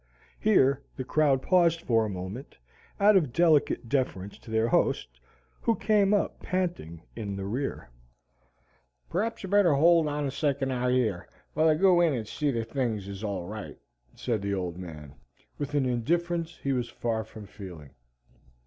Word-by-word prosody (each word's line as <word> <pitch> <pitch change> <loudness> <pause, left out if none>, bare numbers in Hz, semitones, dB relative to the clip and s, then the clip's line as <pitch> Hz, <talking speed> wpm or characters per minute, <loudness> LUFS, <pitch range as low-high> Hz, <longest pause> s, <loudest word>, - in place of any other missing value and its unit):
Here 140 -11 +3
the 130 - -4
crowd 140 -1 +2
paused 170 -2 +3
for 115 -2 +2
a - - -3
moment, 95 +7 -7 0.4
out 205 +1 +6
of 155 -10 +3
delicate 155 -5 +3
deference 105 -7 -2
to - - -14
their 110 +1 +1
host, - - 0 0.4
who 230 - +2
came 205 -1 +2
up 205 -1 +1
panting 170 - -3
in 105 -3 -4
the 95 0 -5
rear. 120 - -4 1.2
"P'r'aps 220 +6 -2
ye'd 190 - -6
better 200 -7 +5
hold 165 +2 +5
on 150 0 -2
a 135 - -2
second 140 -1 -1
out 125 -1 -1
yer, 120 -8 0 0.3
whilst 155 -1 +3
I - - -8
go 185 -2 +5
in 165 -4 +3
and 110 -3 -4
see 145 +6 -1
thet 115 -2 -3
things 115 -8 -2
is 100 +1 -7
all 100 -4 -3
right," 105 +2 -7 0.4
said 115 -5 -2
the 100 0 -1
Old 90 -3 -3
Man, 75 -6 -9 0.5
with 145 0 -3
an 140 -2 +2
indifference 170 +7 -1
he 140 - +1
was 120 -2 -2
far 115 -2 -2
from 110 -1 -11
feeling. 90 -8 -11
130 Hz, 170 wpm, -28 LUFS, 105-165 Hz, 1.2 s, out